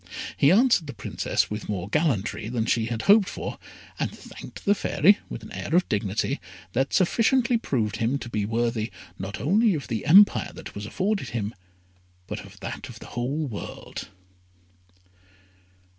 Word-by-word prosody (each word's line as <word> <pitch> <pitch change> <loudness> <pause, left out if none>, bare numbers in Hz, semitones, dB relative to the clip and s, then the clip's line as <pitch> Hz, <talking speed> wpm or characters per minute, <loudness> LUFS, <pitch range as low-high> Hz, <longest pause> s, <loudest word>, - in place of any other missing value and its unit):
He 140 - +5
answered 220 - +4
the 140 - -7
Princess 105 - -1
with 105 0 -5
more 95 -3 -2
gallantry 110 - 0
than 115 -2 -1
she 115 0 +1
had 115 -1 -3
hoped 205 -1 +6
for, - - -5 0.4
and - - 0
thanked - - -11
the 205 - +5
Fairy 200 0 +4
with - - -6
an - - -10
air 160 - -2
of 180 - +4
dignity 105 +7 0 0.3
that 135 +3 +1
sufficiently 235 +6 +3
proved 110 - -1
him 115 +5 +1
to 130 - -7
be 105 -3 -1
worthy 115 +1 0 0.3
not 95 +3 -5
only 200 - +3
of 145 - -5
the 110 -3 -3
empire 195 0 +6
that - - -9
was 100 +1 -6
offered 200 - 0
him, 115 - -4 0.7
but - - -5
of - - -13
that - - -6
of - - -10
the - - -11
whole 135 +6 -1
world. 115 -7 -7
125 Hz, 165 wpm, -26 LUFS, 110-185 Hz, 0.7 s, hoped